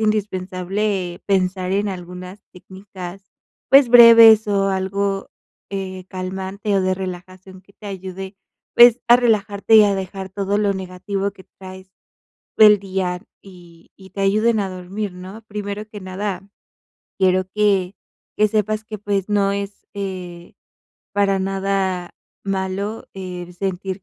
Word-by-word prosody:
indispensable 190 -2 -2
pensar 185 -1 0
en 205 +1 0
algunas 180 +1 -8
técnicas, 190 0 -10 0.5
pues, 270 -2 +7
breves 230 -2 +9
o 195 -1 +1
algo, 195 +1 -2 0.4
eh, 190 -2 -5
calmante, 190 +2 -4
o 190 - +2
de 185 0 +1
relajación 185 0 -8
que 200 - -24
te 210 - -13
ayude, 190 0 -7 0.4
pues, 240 0 +8
a 240 - +8
relajarte 215 -2 +2
y 215 - +8
a 200 - +2
dejar 190 0 -5
todo 200 +1 -1
lo 200 -2 +1
negativo 190 +2 -4
que 190 -1 -17
traes 190 0 -11 0.7
del 210 -1 +7
día 185 -2 -3 0.2
y 175 -3 -17
y 190 -1 -15
te 195 - -4
ayuden 215 +3 +2
a 195 -1 -3
dormir, 185 +2 -5
¿no? 190 +5 -10
Primero 205 0 -5
que 210 -1 -10
nada, 190 +1 -5 0.7
quiero 185 0 +2
que 200 -3 +1 0.4
que 215 0 +3
sepas 215 +1 -1
que, 215 0 -7
pues, 200 -1 -2
no 200 -1 +1
es, 200 0 -6
eh, 180 -3 -7 0.6
para 200 -1 +2
nada 190 -2 -2 0.3
malo 195 +2 -3
el 180 -2 -7
sentir 190 0 -4
195 Hz, 135 wpm, -20 LUFS, 185-205 Hz, 0.7 s, breves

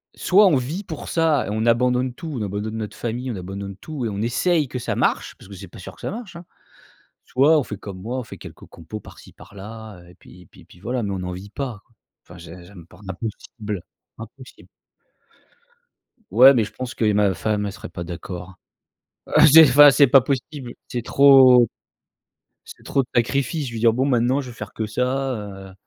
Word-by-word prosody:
soit 200 +2 +4
on 160 - +3
vit 145 +11 -3
pour 160 -5 -8
ça 160 -5 +1
et - - -5
on 110 +2 -1
abandonne 125 +1 +1
tout, 160 +1 -8
on - - -4
abandonne 105 +2 -4
notre 105 -2 -6
famille, 120 +2 -4
on - - -5
abandonne 95 +1 -7
tout 145 0 -6
et - - -1
on 100 0 -4
essaye 145 +6 +1
que 125 - -6
ça - - -3
marche, - - -1
parce - - -16
que 100 - -11
c'est 95 +1 -10
pas 90 - -14
sûr - - -10
que - - -18
ça - - -4
marche, 215 -5 -8
hein. 170 0 -10 0.8
Soit 150 +5 +4
on - - -2
fait 105 - -7
comme 95 -2 -9
moi, 125 +3 -3
on - - -5
fait - - -11
quelques - - -12
compos 85 +6 -10
par - - -15
ci - - -16
par 100 0 -17
là, 110 -1 -10
heu, 85 - -18
et 90 - -17
puis 90 - -17
et - - -22
puis - - -19
puis 90 - -19
voilà 120 +4 -3
mais 100 - -3
on 95 - -3
n'en 90 0 -5
vit 95 +3 -9
pas. 120 -4 -6 0.4
Enfin 90 - -14
j'ai 85 +1 -12
j'aime 90 -3 -14
par 90 +3 -18
n'impossible 105 0 -6 0.4
impossible. 125 +3 -13 1.6
Ouais, 130 +4 +8
mais, 115 -5 +1
je 110 - -10
pense 130 -1 -7
que 115 - -2
et 105 - +2
ma 100 -2 +2
femme 105 -1 -2
elle 100 - -5
serait 115 - -10
pas 85 - -7
d'accord. 90 +2 -8 0.7
Heu, - - -12 0.2
c'est 160 0 +10
enfin 145 +3 +8
c'est 140 0 +5
pas 135 +2 +6
possible. 130 -1 -4
C'est 120 -2 -4
trop, 130 -4 +6 1.0
c'est - - -14
trop 135 - 0
de - - -17
sacrifices, 140 +4 0
je 120 - -7
vais 115 - -5
dire: 115 0 +4
«Bon, 130 +3 0
maintenant, 125 +1 +1
je 130 -3 -6
vais 115 - -11
faire 105 -1 -8
que 110 - -3
ça, 130 +4 -2
heu» 95 -2 -9
115 Hz, 225 wpm, -22 LUFS, 100-135 Hz, 1.6 s, c'est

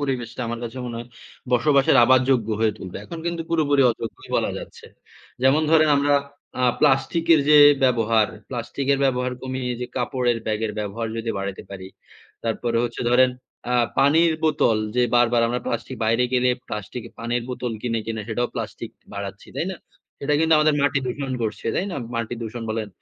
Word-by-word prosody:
পরিবেশটা 125 -4 -3
আমার 120 0 -4
কাছে 120 +3 -6
মনে 120 -1 -5
হয় 120 - -8 0.4
বসবাসের 140 +2 +4
আবার 130 +1 +5
যোগ্য 115 -4 +2
হয়ে 110 -1 +3
তুলবে। 95 -1 -8
এখন 170 - -8
কিন্তু 170 -1 -2
পুরোপুরি 145 -4 +3
অযোগ্যই 115 0 -7
বলা - - 0
যাচ্ছে। - - -11 0.6
যেমন 135 +4 +4
ধরেন, 155 -1 +5
আমরা 145 0 +2 0.5
আ - - +4 0.2
প্লাস্টিক 145 +3 +2
এর 155 - +4
যে 150 - +8 0.3
ব্যবহার, 115 -3 +3 0.2
প্লাস্টিকের 135 +3 -1
ব্যবহার 125 -1 0
কমিয়ে 130 -1 -3
যে 125 - -3
কাপড়ের 125 -1 0
ব্যাগের 110 0 -1
ব্যবহার 105 +2 -3
যদি 115 0 -2
বাড়াইতে 100 0 -5
পারি। 95 -1 -8 0.6
তারপরে 115 +1 -1
হচ্ছে 120 0 -4
ধরেন 130 +1 +5 0.4
আ - - +2 0.2
পানির 160 +4 +4
বোতল 120 -8 +2 0.2
যে 125 - +4
বারবার 120 -1 +3
আমরা 125 +1 -2
প্লাস্টিক 130 - -3
বাইরে 115 +3 +2
গেলে 125 0 +3 0.2
প্লাস্টিকে 115 +2 -6
পানির 120 +1 -1
বোতল 125 -2 -3
কিনে, 115 -2 -1
কিনে 110 -1 -3
সেটাও 120 +2 -1
প্লাস্টিক - - -5 0.2
বাড়াচ্ছি। 100 -1 -7
তাই 165 - -1
না? 190 - -6 0.4
সেটা 145 +1 0
কিন্তু 160 0 +3
আমাদের 155 0 +3
মাটি 140 0 +2
দূষণ 135 +2 -3
করছে। 110 -1 -4
তাই 195 - 0
না? - - -4 0.2
মাটি 115 0 -2
দূষণ 115 +1 -6
বলেন। 110 -1 -3
125 Hz, 175 wpm, -23 LUFS, 115-140 Hz, 0.6 s, যে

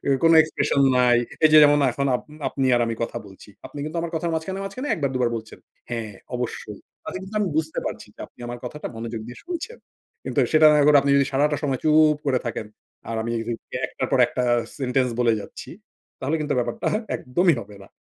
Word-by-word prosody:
এ - - 0
কোন 165 0 +6
এক্সপ্রেশন 145 -2 0
নাই। 125 -1 +4 0.3
এই 155 - +7
যে 155 - +9
যেমন 145 0 +5
এখন 140 +2 -1
আপনি, 150 - -14
আপনি 135 -1 -1
আর - - +1
আমি 115 - -2
কথা 115 - -3
বলছি। 95 +1 -15 0.2
আপনি 145 - -11
কিন্তু 155 +2 -5
আমার 170 0 -4
কথার 165 +1 -1
মাঝখানে, 190 +5 -3
মাঝখানে 255 +9 -5
১ 195 - -1
বার 140 - +1
২ - - 0
বার 120 - +2
বলছেন; 110 -1 -9 0.3
"হ্যাঁ, 115 -3 -4 0.2
অবশ্যই।" 115 -4 -5 0.2
তাতে - - -5
কিন্তু 195 +3 -7
আমি 200 - +1
বুঝতে 160 0 -1
পারছি। - - -5
যে - - -14
আপনি - - -24
আমার 120 0 -6
কথাটা 150 +5 -6
মনোযোগ 115 0 -5
দিয়ে 120 - -10
শুনছেন। 360 +7 -6 0.5
কিন্তু - - 0
সেটা 155 0 +7 0.2
এখন 150 +1 +5
আপনি 140 +1 0
যদি 140 - +3
সারাটা 145 +2 +2
সময় 135 -3 -1
চুপ 155 -1 +5
করে 130 -2 +2
থাকেন, 115 -2 -4 0.4
আর 115 - -2
আমি 115 - -4
এই - - -3
যে, - - 0 0.2
যে - - -2
একটার - - -4
পর 135 - +3
একটা 125 - -2 0.3
সেন্টেন্স 130 -1 +1
বলে 120 -1 +4
যাচ্ছি, - - -10 0.5
তাহলে 145 +5 0
কিন্তু 150 -1 -1
ব্যাপারটা 120 -1 -1 0.3
একদমই 170 +7 +2
হবে 100 -1 -12
না। 95 - -15
140 Hz, 220 wpm, -23 LUFS, 120-155 Hz, 0.5 s, যে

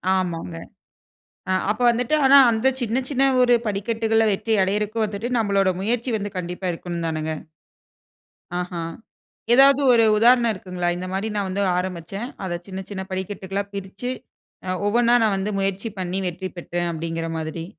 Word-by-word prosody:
ஆமாங்க. 170 - -2 1.0
அ - - +3 0.2
அப்போ 220 +4 -1
வந்துட்டு, 245 +5 0
ஆனா 275 +1 +7
அந்த 225 +3 +2
சின்ன 240 +2 0
சின்ன 270 0 +2 0.2
ஒரு 245 -1 +5
படிக்கட்டுகளா 225 +2 +1
வெற்றி 220 +3 0
அடையிறக்கு 210 +3 -1
வந்துட்டு, 210 +3 -4
நம்மளோட 200 -3 +2
முயற்சி 240 +4 0
வந்து 205 0 -4
கண்டிப்பா 180 +1 -5
இருக்கணும்தானுங்க? 165 -2 -3 1.3
ஆஹா! 180 -1 -4 0.7
ஏதாவது 275 +2 +6
ஒரு 230 -1 +5
உதாரணம் 235 +1 +5
இருக்குங்களா? 180 -2 -3
இந்த 185 +1 -5
மாரி 195 +3 -1
நான் 200 -2 -1
வந்து 195 +2 -1 0.2
ஆரம்பிச்சேன். 185 +5 -4 0.2
அதை 175 -1 -2
சின்ன 190 0 -6
சின்ன 190 -1 -4
படிக்கட்டுகளா 195 +1 -3
பிரிச்சு, 200 +5 -5 0.6
அ - - 0 0.2
ஒவ்வொண்ணா 235 +2 +3
நான் 205 -3 +2
வந்து 195 +2 -2
முயற்சி 195 +3 -2
பண்ணி 185 +1 -2
வெற்றி 185 +2 -4
பெற்றேன், 175 0 -3
அப்பிடீங்கிற 165 0 -4
மாதிரி. 160 +1 -5
195 Hz, 145 wpm, -23 LUFS, 180-225 Hz, 1.3 s, ஆனா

